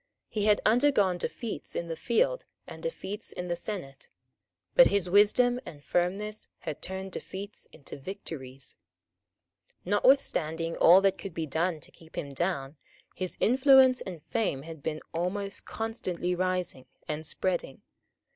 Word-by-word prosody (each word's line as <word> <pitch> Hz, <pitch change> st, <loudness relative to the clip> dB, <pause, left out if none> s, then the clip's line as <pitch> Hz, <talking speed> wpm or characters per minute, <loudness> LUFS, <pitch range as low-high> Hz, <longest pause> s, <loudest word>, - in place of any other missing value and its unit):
He 210 Hz, -2 st, -1 dB
had 210 Hz, -1 st, +4 dB
undergone 215 Hz, -6 st, +4 dB
defeats 230 Hz, +5 st, -4 dB
in 170 Hz, -, -2 dB
the 165 Hz, -, -3 dB
field 240 Hz, -, +1 dB, 0.2 s
and -, -, -10 dB
defeats 220 Hz, -, -5 dB
in 180 Hz, 0 st, -5 dB
the 175 Hz, -, +1 dB
senate; 170 Hz, -9 st, -6 dB, 0.7 s
but -, -, +8 dB
his 200 Hz, -3 st, +1 dB
wisdom 210 Hz, +6 st, +4 dB
and 145 Hz, -, -11 dB
firmness 200 Hz, +6 st, -1 dB
had 155 Hz, -4 st, -5 dB
turned 190 Hz, +1 st, -4 dB
defeats 200 Hz, +3 st, -7 dB
into 145 Hz, -2 st, -10 dB
victories. 135 Hz, -, -7 dB, 1.1 s
Notwithstanding 170 Hz, -, +2 dB
all 180 Hz, +3 st, +7 dB
that 195 Hz, -1 st, +2 dB
could 195 Hz, -5 st, -7 dB
be 165 Hz, -, -1 dB
done 160 Hz, +2 st, 0 dB
to -, -, -12 dB
keep 160 Hz, -1 st, -17 dB
him 140 Hz, -, -3 dB
down, 140 Hz, -1 st, -2 dB, 0.4 s
his 185 Hz, -1 st, -5 dB
influence 260 Hz, +1 st, +6 dB
and 175 Hz, -5 st, -7 dB
fame 205 Hz, -, -1 dB
had 160 Hz, -1 st, -9 dB
been 155 Hz, +2 st, -3 dB
almost 195 Hz, +4 st, -2 dB
constantly 185 Hz, -6 st, -3 dB
rising 180 Hz, -7 st, -2 dB, 0.2 s
and 155 Hz, +1 st, -3 dB
spreading. 170 Hz, -3 st, -2 dB
185 Hz, 140 wpm, -29 LUFS, 160-210 Hz, 1.1 s, but